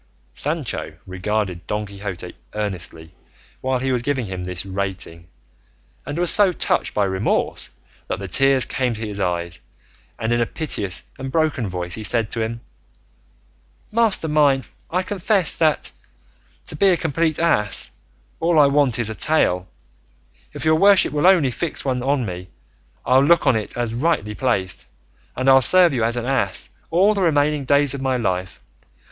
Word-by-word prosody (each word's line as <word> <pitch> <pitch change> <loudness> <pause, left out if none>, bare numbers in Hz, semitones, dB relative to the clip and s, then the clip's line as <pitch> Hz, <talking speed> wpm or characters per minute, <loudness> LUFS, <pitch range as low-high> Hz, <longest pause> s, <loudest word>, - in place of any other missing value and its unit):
Sancho 150 - -3
regarded 95 -1 -3
Don 105 0 -2
Quixote 100 -3 -7 0.2
earnestly 85 -6 -5 0.5
while 130 0 0
he 130 +1 -2
was 125 -2 +1
giving 130 -1 -1
him 95 -2 -6
this 90 0 -3
rating, 95 -3 -5 0.8
and 145 - -4
was 175 0 +3
so 205 -3 +6
touched - - 0
by 105 - +2
remorse 95 +2 -1 0.4
that - - -2
the 100 - -6
tears 135 +7 +3
came 125 -3 -1
to 110 0 -5
his 100 -1 -5
eyes, 85 -2 -2 0.6
and 110 +1 -1
in 120 - +1
a 115 - +1
piteous 100 - -3 0.2
and 130 0 -5
broken 155 -8 0
voice 90 -1 -4
he 110 - -3
said 110 0 +1
to 115 - -2
him, 115 +1 -4 1.3
"Master 220 -7 +2
mine, 145 -3 +2 0.2
I 180 +2 0
confess 190 -1 +1
that, 155 -2 +1 0.7
to - - -6
be 195 +6 +3
a 180 - +3
complete 160 0 0
ass, 105 -12 +1 0.5
all 165 0 +1
I 150 - +7
want 140 -4 +2
is 115 -2 0
a - - -3
tail; 95 - +1 0.8
if - - -7
your 155 0 +4
worship 200 -1 +5
will 150 +4 +2
only 170 -9 +4
fix 160 +4 -3
one 130 -2 -1
on 135 +2 0
to - - -2
me, 90 -1 -7 0.6
I'll 130 +1 +4
look 170 +4 +4
on 125 - +4
it 110 +1 -4
as 120 -2 -2
rightly 125 -5 0
placed, 105 -6 -1 0.5
and 130 +1 -2
I'll 135 0 +7
serve 175 +4 +7
you 120 -3 0
as 115 +2 +1
an 120 - -3
ass 125 -8 -1 0.2
all 190 +6 +3
the 200 - -2
remaining 150 -4 +1
days 140 0 +3
of 140 - -5
my 130 -1 0
life. 95 -5 -3
125 Hz, 170 wpm, -21 LUFS, 100-155 Hz, 1.3 s, I